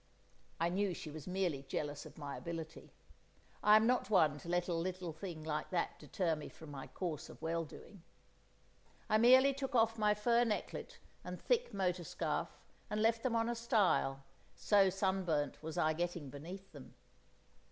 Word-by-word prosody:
I 165 +1 +2
knew 190 0 0
she 155 - -7
was 150 -1 -8
merely 180 -6 0
jealous 145 +1 -4
of - - -15
my 145 -2 -5
ability. 165 -1 -7 0.7
I'm 215 +1 +6
not 245 -4 +2
one 155 -8 +4
to 170 - -9
let 175 0 +1
a 175 - 0
little 180 0 -3
thing 160 -1 -7
like 155 -1 -2
that 175 -2 -1
deter 170 -4 -1
me 150 - -7
from 160 -2 -12
my 135 -2 -7
course 170 -6 -4
of - - -12
well 165 +1 -1
doing. 190 +5 -13 1.1
I 215 - +5
merely 260 +4 +7
took 270 -1 -4
off 225 -1 +3
my 210 -1 +4
fur 235 +3 +3
necklet 225 -3 -3 0.3
and - - -6
thick - - +1
motor 185 -3 0
scarf, - - -3 0.3
and 210 - -1
left 225 +1 +3
them 240 -2 0
on 230 0 +2
a 240 - 0
stile, 210 - +2 0.3
so 200 -2 +4
sunburnt 185 -6 0
was 160 0 -6
I 155 0 +3
getting 170 -4 -3
beneath 180 +7 -9
them. 140 -4 -12
180 Hz, 175 wpm, -36 LUFS, 160-215 Hz, 1.1 s, merely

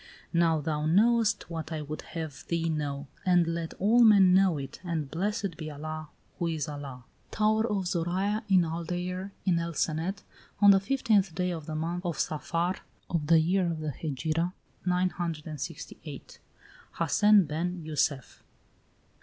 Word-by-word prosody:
"Now 165 -2 +3
thou 150 0 -1
knowest 215 +3 +3
what 165 -1 -5
I 155 -1 -3
would 150 +1 -6 0.2
have 160 -4 -6
thee 165 -1 0
know, 145 -2 -2 0.2
and 180 -2 +4
let 165 0 -3
all 225 +5 +4
men 200 -5 +7
know 190 -3 +4
it, 135 -1 -7
and 160 -6 -3
blessed 200 0 -2
be 155 -2 -5
Allah 155 +1 -6 0.3
who 170 - 0
is 160 -4 -2
Allah! 140 -4 -7 0.3
"Tower 220 +1 +2
of 195 -3 0
Zoraya, 185 +5 0
in 185 -3 +5
Aldeire, 175 +3 -3 0.2
in 175 -3 +3
El 170 -1 -4
Cenet, 165 +7 -1 0.4
On 205 -1 +8
the 195 - +6
fifteenth 205 -5 +1
day 180 0 0
of 160 -3 -6
the 155 - -4
month 170 +3 -2
of 170 -3 -2
Saphar, 170 +4 -1 0.3
Of 160 -4 -1
the 165 0 +6
year 180 +3 +2
of 165 -2 -2
the 155 -1 -3
Hegira 160 +5 -2 0.3
968. 170 -5 -3 0.5
"HASSEN 205 +4 +4
BEN 170 +3 -3
JUSSEF." 145 -4 -1
170 Hz, 155 wpm, -29 LUFS, 155-185 Hz, 0.5 s, On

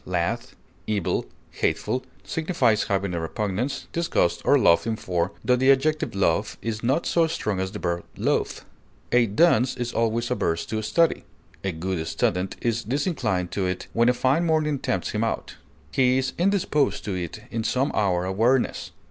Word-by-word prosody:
lath, 90 -2 -2 0.3
evil, 105 -5 -1 0.2
hateful) 130 - -1 0.2
signifies 125 - +1
having 100 -2 -1
a 85 - -1
repugnance, 105 - -2
disgust, 165 - +1
or - - +5
loathing 85 +7 +3
for, 90 -3 -1
tho 125 - +4
the 130 +2 +5
adjective 155 -2 +1
loath 95 +1 +1
is 110 -1 -4
not 135 +8 +1
so 165 -1 +3
strong 105 -11 -2
as 95 0 -2
the - - -6
verb 85 -1 -2
loathe. - - 0 0.5
A 120 -1 +4
dunce 125 +2 +3
is 120 0 -3
always 115 +1 0
averse 85 -9 0
to 110 -1 -3
study; 110 +10 +2 0.4
a 95 - 0
good 85 0 -3
student 90 +3 0
is 115 -1 0
disinclined 115 - -1
to 95 -2 -1
it 90 0 -3
when 115 +1 +4
a - - +4
fine 135 +7 +2
morning 155 -3 +1
tempts 95 - -2
him 105 +1 -1
out; 115 - -3 0.3
he 130 -1 +3
is 130 0 -1
indisposed 180 -6 +1
to 100 - -2
it 90 +3 -5
in 115 -1 -2
some 130 +5 +1
hour 90 -4 +1
of 95 +1 -3
weariness. 125 +3 +1
110 Hz, 170 wpm, -25 LUFS, 95-130 Hz, 0.5 s, or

